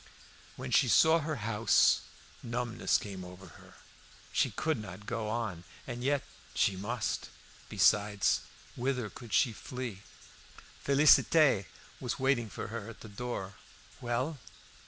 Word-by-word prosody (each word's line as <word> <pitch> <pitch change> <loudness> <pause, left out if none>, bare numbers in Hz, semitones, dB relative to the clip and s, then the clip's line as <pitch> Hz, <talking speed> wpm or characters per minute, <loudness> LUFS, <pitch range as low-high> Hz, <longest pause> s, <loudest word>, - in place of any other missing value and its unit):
When - - -6
she - - +5
saw 160 +1 +5
her 155 0 -3
house 110 0 +4 0.4
a - - -10
numbness 120 0 0
came 95 -3 -7
over 90 +1 -11
her. - - -16 0.6
She - - +2
could 155 -6 -1
not 105 0 -9
go 115 -2 -3
on; 110 -7 -3 0.2
and 120 -1 -6
yet 140 +1 +1 0.3
she 100 - +2
must. 110 +6 -3 0.4
Besides, 100 +1 +3 0.4
whither 125 -3 -2
could 120 -3 -11
she 120 +2 +3
flee? 120 -4 -6 0.8
Félicité 140 - +5 0.3
was 125 - -3
waiting 130 -4 +1
for - - -6
her 115 -1 -6
at 115 - -12
the 110 - -10
door. 100 -3 -5 0.5
"Well?" 130 +5 -2
115 Hz, 135 wpm, -31 LUFS, 105-130 Hz, 0.8 s, she